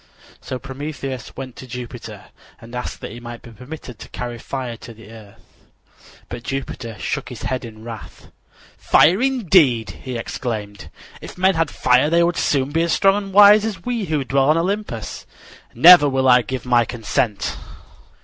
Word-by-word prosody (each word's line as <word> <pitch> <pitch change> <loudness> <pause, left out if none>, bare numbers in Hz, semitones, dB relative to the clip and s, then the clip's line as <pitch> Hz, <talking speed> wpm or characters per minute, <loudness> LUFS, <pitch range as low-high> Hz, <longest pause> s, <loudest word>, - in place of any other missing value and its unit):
So 130 - -5
Prometheus 135 -1 -7
went 130 -2 -7
to 130 - -10
Jupiter 115 -3 -9 0.3
and 115 +1 -14
asked 125 0 -5
that - - -7
he 115 - -9
might 120 0 -9
be 120 - -12
permitted 125 0 -10
to - - -11
carry 120 -1 -6
fire 125 -1 -5
to 115 0 -12
the 110 0 -14
earth. 110 -3 -14 0.9
But 120 - -7
Jupiter 125 -4 -5
shook - - -4
his - - -9
head 130 -1 -2
in 110 -2 -10
wrath. 115 -2 -10 0.5
"Fire, 180 +8 +4
indeed!" 180 - +3
he 130 -3 -5
exclaimed. 110 -3 -5 0.3
"If - - -10
men 190 +1 +3
had 165 -3 0
fire 125 +3 +2
they 170 +1 +3
would 170 0 0
soon 140 -1 0
be 165 +2 +1
as 170 0 +1
strong 195 0 +4
and 195 - -9
wise 205 +1 +7
as 205 -6 -5
we 235 -4 -2
who 155 -4 -1
dwell 135 +1 +1
on 155 - +4
Olympus. 180 - -3 0.5
Never 155 +3 +8
will 130 0 +1
I 125 -1 +6
give 125 +2 -5
my 120 -1 +4
consent." 115 -1 -2
130 Hz, 175 wpm, -20 LUFS, 120-165 Hz, 0.9 s, Never